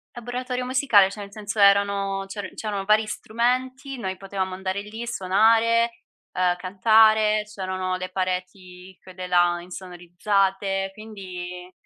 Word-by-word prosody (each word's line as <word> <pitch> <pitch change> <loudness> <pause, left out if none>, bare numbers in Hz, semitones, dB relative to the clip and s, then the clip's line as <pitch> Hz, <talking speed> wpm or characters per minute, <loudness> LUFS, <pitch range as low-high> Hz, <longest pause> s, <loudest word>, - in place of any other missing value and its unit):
Laboratorio 250 +1 -4
musicale, 250 -7 +4
cioè 210 - -9
nel 200 0 -9
senso 210 +1 -6
erano 200 -1 +3
c'eran 205 +1 -6
c'erano 205 -3 -4
vari 215 +1 +4
strumenti, 255 +5 -2
noi 190 -4 -4
potevamo 190 -1 -4
andare 190 +1 -3
lì, 220 +3 -7
suonare, 230 +3 +2 0.3
uhm, 180 -1 +1
cantare, 215 +3 +4
c'erano 185 -1 -3
le 185 0 -5
pareti 185 0 -5
quelle 185 0 -8
là 175 -1 +3
insonorizzate, 190 +2 -2
quindi 185 -4 -8
195 Hz, 120 wpm, -24 LUFS, 185-220 Hz, 0.3 s, musicale